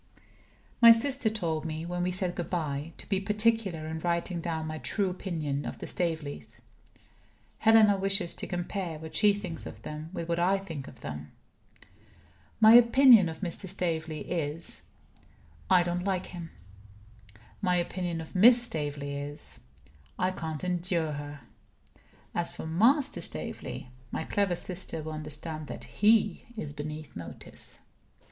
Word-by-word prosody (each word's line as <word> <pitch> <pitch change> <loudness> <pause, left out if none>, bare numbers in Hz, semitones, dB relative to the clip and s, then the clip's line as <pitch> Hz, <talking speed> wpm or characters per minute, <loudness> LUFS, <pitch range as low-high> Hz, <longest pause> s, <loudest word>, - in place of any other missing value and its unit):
My 235 - +11
sister 245 +1 +5
told 170 -8 -2
me 160 0 -4
(when 175 +1 -3
we 180 - +1
said 180 -1 +2
good 175 -2 -4
by) 155 -3 -2
to - - -9
be 195 -2 +1
particular 210 -4 +1
in 160 0 -4
writing 170 +1 -1
down 160 -2 -2
my 155 0 -4
true 195 +1 0
opinion 155 -6 -3
of - - -5
the - - -7
Staveleys. 160 -5 -3 1.0
Helena 220 -2 +6
wishes 195 -2 +1
to - - -5
compare 175 -2 -3
what 160 +1 -9
she 210 -1 +6
thinks 185 -5 -4
of 110 - -10
them 155 +1 -6
with 170 -3 -5
what 170 0 0
I 185 +3 +3
think 165 -8 -7
of 125 - -13
them. 75 0 -7 1.3
My 220 0 +8
opinion 240 -4 +8
of 160 0 -8
Mr. 185 +1 -3
Staveley 160 -4 -2
is 165 -1 -3 0.9
I 180 -2 +6
don't 175 0 -2
like 190 -1 -1
him. 170 -2 -7 1.1
My 180 -3 +2
opinion 175 -1 -2
of 160 - -10
Miss 235 +6 +7
Staveley 145 -9 -3
is 145 +1 -5 0.6
I 185 +1 +1
can't 160 -4 -5
endure 175 -3 0
her. 145 -1 -6 0.9
As 170 - -1
for - - -6
Master 230 - +3
Staveley, 125 - -6 0.2
my - - -2
clever 195 0 0
sister 175 -3 -5
will 155 - -5
understand 155 0 -5
that - - -7
he 210 -2 +3
is 150 -8 -4
beneath 150 +1 -7
notice. 85 -3 -9
170 Hz, 150 wpm, -29 LUFS, 155-195 Hz, 1.3 s, My